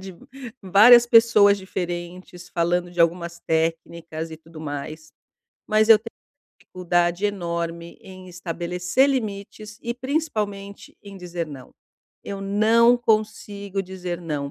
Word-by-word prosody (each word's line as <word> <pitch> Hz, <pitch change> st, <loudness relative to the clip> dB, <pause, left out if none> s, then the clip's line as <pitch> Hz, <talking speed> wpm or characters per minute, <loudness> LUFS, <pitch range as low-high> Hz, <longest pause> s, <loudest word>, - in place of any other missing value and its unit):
de 190 Hz, 0 st, -9 dB, 0.5 s
várias 220 Hz, +6 st, +7 dB
pessoas 225 Hz, -4 st, +5 dB
diferentes 180 Hz, -1 st, -7 dB
falando 175 Hz, +1 st, -1 dB
de 175 Hz, 0 st, -4 dB
algumas 170 Hz, 0 st, 0 dB
técnicas 165 Hz, 0 st, -2 dB
e -, -, -8 dB
tudo 160 Hz, 0 st, -14 dB
mais, 155 Hz, +1 st, -7 dB, 0.6 s
mas 215 Hz, +1 st, +2 dB
eu 225 Hz, -, +9 dB
te 220 Hz, -, -35 dB, 0.6 s
dificuldade 175 Hz, +1 st, -1 dB
enorme 170 Hz, -3 st, -4 dB
em 185 Hz, -1 st, -13 dB
estabelecer 180 Hz, -, -1 dB
limites 215 Hz, -4 st, -5 dB
e 235 Hz, 0 st, -3 dB
principalmente 215 Hz, -8 st, -4 dB
em 200 Hz, -1 st, -11 dB
dizer 175 Hz, -2 st, -5 dB
não. 135 Hz, -4 st, -11 dB, 0.6 s
Eu 200 Hz, -1 st, -5 dB
não 220 Hz, +4 st, +4 dB
consigo 210 Hz, -3 st, -2 dB
dizer 180 Hz, -2 st, -6 dB
não, 150 Hz, -5 st, -4 dB
185 Hz, 120 wpm, -23 LUFS, 170-210 Hz, 0.6 s, eu